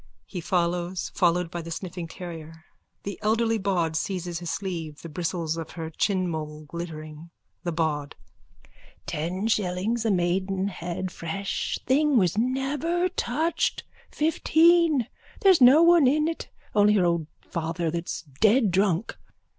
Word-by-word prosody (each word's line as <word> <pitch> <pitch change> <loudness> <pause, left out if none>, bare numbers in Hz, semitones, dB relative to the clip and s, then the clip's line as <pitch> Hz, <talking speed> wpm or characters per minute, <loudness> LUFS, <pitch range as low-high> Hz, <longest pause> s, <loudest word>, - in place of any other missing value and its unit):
_(He 180 -4 -6
follows, 175 +1 -1
followed 175 -2 +2
by 175 - -4
the 165 - -8
sniffing 170 0 -5
terrier. 165 -2 -9 0.4
The 200 - -5
elderly 225 +1 +1
bawd 175 -5 0
seizes 175 -1 -2
his 175 -1 -5
sleeve, 165 -7 -4
the 165 - -7
bristles 165 0 -2
of 165 -1 -6
her 160 -2 -6
chinmole 160 -5 -2
glittering.)_ 155 -1 -7 0.3
THE 175 - -1
BAWD: 155 -3 -1 0.9
Ten 180 +7 -2
shillings 210 +2 0
a 225 - +1
maidenhead. 185 -1 -1
Fresh 195 +5 -3
thing 285 +1 +3
was 180 -5 +3
never 275 +9 0
touched. 320 0 -1 0.3
Fifteen. 320 -2 +3 0.4
There's 380 -6 +6
no 265 +6 +8
one 340 -5 +6
in 305 +4 +3
it 330 - -4 0.2
only 210 0 +5
her 185 -3 +3
old 170 -3 0
father 165 0 -3
that's 170 -1 -4
dead 210 - +2
drunk. 190 +1 +1
180 Hz, 130 wpm, -26 LUFS, 165-225 Hz, 0.9 s, no